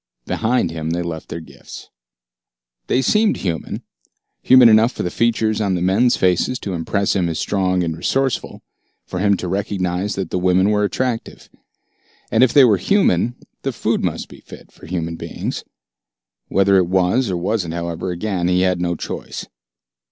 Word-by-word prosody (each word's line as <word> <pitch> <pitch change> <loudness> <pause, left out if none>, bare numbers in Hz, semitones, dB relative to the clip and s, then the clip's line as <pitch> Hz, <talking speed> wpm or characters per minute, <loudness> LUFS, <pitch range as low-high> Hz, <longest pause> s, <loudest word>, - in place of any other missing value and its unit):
Behind 115 -6 0
him 80 -1 -4
they 85 +1 -1
left 80 -2 -6
their 85 - -5
gifts. 80 - -12 1.0
They 130 - +1
seemed 210 - +2
human, 85 -4 -4 0.6
human 130 -2 +7
enough 110 +2 +5
for - - -4
the 90 - -2
features 110 -2 +1
on 100 -3 +1
the 90 - -2
men's 110 +7 +3
faces 95 +7 +1
to 100 - -4
impress 100 +5 -1
him 90 -3 +1
as 80 - -3
strong 95 -2 0
and 80 -2 -2
resourceful, 135 +9 -2 0.4
for 90 - -5
him 100 0 +3
to 90 - -5
recognize 95 0 -2
that 95 - -4
the 90 - 0
women 95 +2 +3
were 105 0 +2
attractive. 120 +2 -3 0.8
And 115 - +4
if 130 - +4
they 140 - +7
were 110 -5 +5
human, 120 - +2 0.3
the - - -2
food - - -1
must - - -2
be - - -14
fit - - -14
for - - -15
human 85 -1 -3
beings. - - -5 0.8
Whether 100 0 +3
it 90 -2 +3
was 95 +6 +1
or 90 - -1
wasn't, 90 -2 -2
however, 85 +1 -4
again 90 0 -2
he 90 0 +2
had 90 -1 +1
no 85 0 0
choice. - - -6
95 Hz, 175 wpm, -20 LUFS, 90-110 Hz, 1.0 s, human